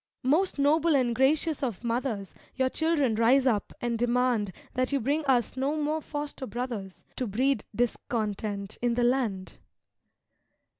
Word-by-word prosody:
Most 315 +9 +2
noble 305 +3 +3
and 250 -3 +2
gracious 295 +5 +2
of 240 -6 -3
mothers, 230 -4 -2 0.2
Your 260 -1 +1
children 310 -5 +1
rise 240 +5 +4
up 220 -6 +1
and 235 -1 -2
demand 240 -4 +1 0.2
That 255 +1 0
you 280 - +2
bring 285 +6 0
us 250 -4 +2
no 270 +3 0
more 305 +1 0
foster 290 -3 -5
brothers, 235 -7 -5
To 255 - -1
breed 250 +3 +1
discontent 215 -3 -2
in 240 -1 +1
the 245 - +1
land. 240 -7 0
250 Hz, 145 wpm, -28 LUFS, 230-280 Hz, 0.2 s, rise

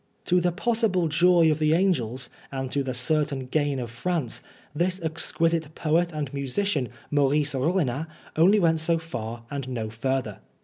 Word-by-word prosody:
To 180 0 +3
the 175 0 +2
possible 210 -3 +1
joy 170 +1 +4
of 155 - -1
the 155 0 +3
angels 130 - 0 0.2
and 135 -1 -4
to 140 - +1
the 130 -1 -3
certain 140 +1 0
gain 145 +1 0
of 120 -2 -5
France, 130 +1 -2 0.3
this 180 +4 0
exquisite 160 -1 -1
poet 170 +2 +1
and 150 -3 -4
musician, 140 +1 -1 0.2
Maurice 145 0 +2
Rollinat, 150 0 0
went - - -21 0.3
only 170 -1 +4
so 165 +1 +2
far 120 -8 -6
and 140 -2 -4
no 115 -4 -3
further. 115 -2 -2
150 Hz, 160 wpm, -26 LUFS, 130-170 Hz, 0.3 s, joy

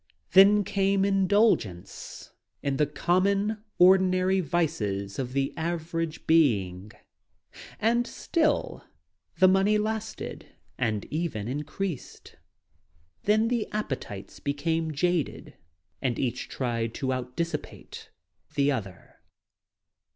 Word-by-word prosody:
Then 200 +2 +7
came 195 0 +1
indulgence 195 - 0 0.3
in 140 -1 0
the 150 - +2
common, 200 +7 +1
ordinary 185 +1 +5
vices 105 - -1
of 130 -1 -3
the 135 0 0
average 165 -1 -3
being. 105 - +2 0.9
And 235 +3 +2
still 310 -3 -1 0.5
the 185 - +6
money 195 +3 +4
lasted 220 +1 -4 0.2
and 110 -5 -1
even 150 -10 -2
increased. 150 +4 -5 0.9
Then 215 +2 +3
tne 235 -3 0
appetites 135 - -5
became 160 +3 -1
jaded 170 0 -1 0.5
and 125 -4 -1
each 125 -4 -2
tried 115 -3 -2
to 130 -1 -1
out 125 0 -5
dissipate 165 -2 -5 0.5
the 140 0 +3
other. 95 -9 -6
165 Hz, 100 wpm, -27 LUFS, 130-195 Hz, 0.9 s, Then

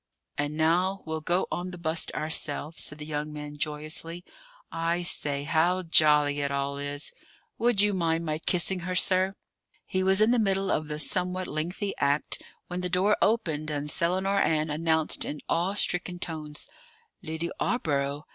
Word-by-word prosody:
"And 145 +1 -2
now 180 +5 +2
we'll 160 -1 -3
go 175 +4 +1
on 180 +1 -3
the 180 - -8
bust 160 -1 +1
ourselves," 155 0 0
said 150 - -1
the 150 - -7
young 150 0 -3
man 150 0 -7
joyously. 155 +3 -3 0.5
"I 170 +1 -1
say, 145 -4 0
how 170 +5 +2
jolly 150 -3 +4
it 140 -1 0
all 140 0 -2
is! 145 +1 -4 0.5
Would 235 -3 +4
you 205 0 +4
mind 165 -2 0
my 155 -1 -1
kissing 180 +2 +3
her, 180 +1 -4
sir?" 185 +1 +3 0.5
He 185 - -1
was 190 +1 +3
in 215 +2 +5
the 245 - +3
middle 195 -2 +1
of 155 - 0
the 150 0 -4
somewhat 180 +4 0
lengthy 180 +6 -3
act, 140 +1 +1 0.2
when 180 0 -4
the 180 - -2
door 190 +4 +3
opened, 160 -9 +1
and 150 0 -1
Selinar 190 +5 +2
Ann 155 -1 +1
announced 160 0 +1
in 150 - -4
awe 180 +4 0
stricken 180 -2 0
tones: 155 -3 -5 0.5
"Lidy 160 +2 -4
'Awborough!" 145 - -1
165 Hz, 165 wpm, -27 LUFS, 150-185 Hz, 0.5 s, in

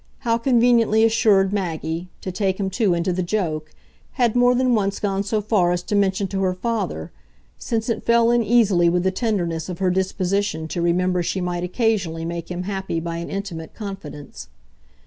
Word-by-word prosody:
How 230 -3 +1
conveniently 235 -3 +3
assured 210 -4 +3
Maggie 170 -2 -3
to 185 - -4
take 190 0 -1
him 195 -1 -1
too 200 -4 +2
into 170 +2 0
the 185 - -1
joke 165 -5 -2 0.4
had 240 -3 +1
more 245 0 +4
than 255 0 +2
once 200 -3 0
gone 195 -1 -1
so 210 +2 -1
far 200 -4 +2
as 175 0 -1
to 205 - -2
mention 195 -1 +1
to 195 -1 -2
her 185 -1 +1
father; 195 - -3 0.5
since 225 -1 -2
it 230 - -2
fell 235 0 +4
in 240 0 +3
easily 210 -7 +3
with 175 +1 +1
the 190 - +2
tenderness 185 -6 -2
of 180 - -5
her 185 0 +1
disposition 190 -2 -1
to 175 - -3
remember 180 +1 +1
she 180 +2 -2
might 175 -1 -2
occasionally 180 -5 -1
make 170 0 -5
him 180 0 -4
happy 190 -3 -3
by 165 0 -4
an 170 - -5
intimate 185 -5 -6
confidence. 195 - -8
190 Hz, 185 wpm, -22 LUFS, 175-220 Hz, 0.5 s, more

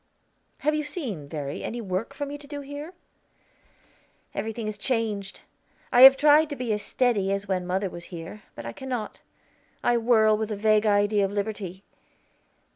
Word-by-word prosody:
Have 305 - +2
you 305 - 0
seen, 250 - -5
Verry, 145 -2 -5
any 240 - -4
work 205 +5 -3
for 285 0 -3
me 285 +1 -6
to 285 - -14
do 290 0 -6
here?" 290 +5 -8 1.4
"Everything 225 0 -4
is 210 -1 -5
changed. 215 -5 -1 0.5
I 245 - +6
have 270 +1 +11
tried 300 +2 +5
to 290 - -4
be 245 -4 -2
as 210 - -2
steady 205 -3 +1
as 200 +1 -2
when 185 -2 -1
mother 190 +2 0
was 175 -1 -8
here, 170 +4 -9
but 115 - -8
I 115 - -5
cannot; 250 - -5 0.6
I 240 - +3
whirl 220 -2 +4
with 220 0 -3
a - - -1
vague 215 +1 +3
idea 205 0 +3
of 195 - 0
liberty. 200 -2 -4
215 Hz, 175 wpm, -26 LUFS, 195-265 Hz, 1.4 s, have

